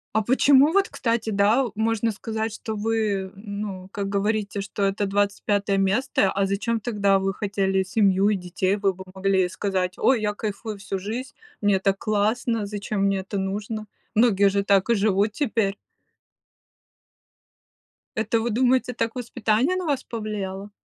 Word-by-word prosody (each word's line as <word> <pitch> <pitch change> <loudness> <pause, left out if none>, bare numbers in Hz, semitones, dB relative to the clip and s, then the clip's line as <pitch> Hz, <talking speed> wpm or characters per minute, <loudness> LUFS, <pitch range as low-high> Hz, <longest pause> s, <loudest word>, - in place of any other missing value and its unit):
А 220 - +4
почему 270 +5 +5
вот, 395 0 +3
кстати, 230 -2 -1
да, 215 +5 +3
можно 225 +1 +1
сказать, 220 +1 -4
что 220 0 -5
вы 210 -3 -1
ну 200 -2 -6
как 200 -1 -3
говорите, 205 0 -1
что 200 +1 -4
это 195 +1 +1
25 200 0 0
место. 195 +1 +2
А 195 0 +1
зачем 215 +4 -1
тогда 200 -3 +2
вы 195 0 -1
хотели 195 -2 0
семью 195 0 +3
и 210 - +2
детей, 185 +2 -1
вы 195 -2 +1
бы 190 +1 -10
могли 190 -1 +2
сказать: 185 -1 -2
"Ой, 255 -4 +3
я 210 -1 0
кайфую 215 0 -5
всю 195 0 -4
жизнь, 245 +8 -5 0.3
мне 205 -2 +3
так 195 0 +1
классно, 215 +2 0
зачем 205 0 -3
мне 195 -1 +2
это 195 +2 -5
нужно?" 205 +3 -3 0.3
Многие 205 -3 +4
же 200 0 0
так 195 +1 +3
и 235 - +4
живут 205 +1 +2
теперь. 220 -7 0 2.4
Это 225 +1 +1
вы 235 - -1
думаете, 250 +2 +2
так 230 -1 -2
воспитание 245 +5 0
на 370 -1 -2
вас 285 -4 0
повлияло? 205 -3 -5
205 Hz, 155 wpm, -24 LUFS, 195-225 Hz, 2.4 s, почему